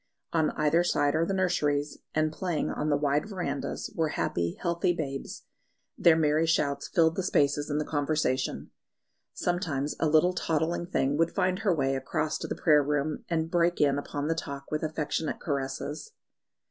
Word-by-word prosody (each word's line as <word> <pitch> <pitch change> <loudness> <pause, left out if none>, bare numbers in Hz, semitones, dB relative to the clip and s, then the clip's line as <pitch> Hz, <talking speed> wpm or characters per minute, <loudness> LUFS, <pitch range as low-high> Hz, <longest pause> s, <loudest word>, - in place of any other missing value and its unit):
On 160 -2 +3
either 155 +3 +3
side 145 -4 +2
are 165 +2 +1
the 195 - -1
nurseries, 150 -6 0 0.2
and 155 0 +1
playing 175 -3 -2
on 150 - -2
the 145 - +3
wide 145 +5 0
verandahs 175 -8 -3
were 160 -1 +1
happy, 85 - -2
healthy 170 +1 +1
babes; 135 -5 -5 0.5
their 170 -2 +5
merry 155 0 +2
shouts 140 -3 +1
filled 165 -3 +3
the - - 0
spaces 145 -5 +1
in 145 - 0
the 150 - -1
conversation. 145 -3 -1 0.6
Sometimes 160 -6 -1
a 160 - +2
little 160 +4 +4
toddling 165 0 -1
thing 145 -5 0
would 165 +1 +1
find 185 -1 +1
her 200 -6 +2
way 135 -2 +1
across 135 +3 -2
to - - -4
the - - -3
prayer 150 -2 +4
room, 145 +1 -1
and 165 -1 -1
break 175 0 +2
in 140 -1 +3
upon 145 0 -4
the 165 - +2
talk 140 -3 -6
with 155 - -1
affectionate 155 0 -2
caresses. 145 - -4
155 Hz, 170 wpm, -28 LUFS, 145-170 Hz, 0.6 s, their